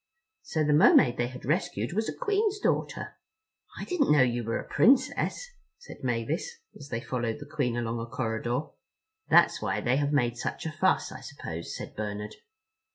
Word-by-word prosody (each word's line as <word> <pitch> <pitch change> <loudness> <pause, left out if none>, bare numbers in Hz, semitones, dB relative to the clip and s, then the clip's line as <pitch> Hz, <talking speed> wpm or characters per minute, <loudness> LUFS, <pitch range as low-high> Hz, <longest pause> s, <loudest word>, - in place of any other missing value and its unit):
So 165 - -1
the 150 0 +2
Mermaid 130 -4 +6
they 120 - 0
had 125 +1 -9
rescued 175 +4 -1
was 220 +3 0
a - - -6
Queen's 415 0 +1
daughter! - - -2 0.6
"I - - -5
didn't 360 -7 +1
know 145 -3 +6
you 120 -1 0
were 115 +1 -1
a - - -8
Princess," 270 - +2 0.3
said 485 - -13
Mavis, 130 - -2 0.2
as 145 0 -11
they 115 -1 -3
followed 120 -3 -2
the 145 - -9
Queen 140 -5 -1
along 115 -1 -2
a 115 - -5
corridor. 120 +1 -2 0.7
"That's - - +5
why - - -1
they 125 +2 +1
have 145 0 0
made 120 -5 +1
such - - -4
a 160 - -2
fuss, 185 +5 +1
I - - -8
suppose," 85 - -7
said - - -8
Bernard. 105 0 -4
135 Hz, 180 wpm, -28 LUFS, 120-175 Hz, 0.7 s, Mermaid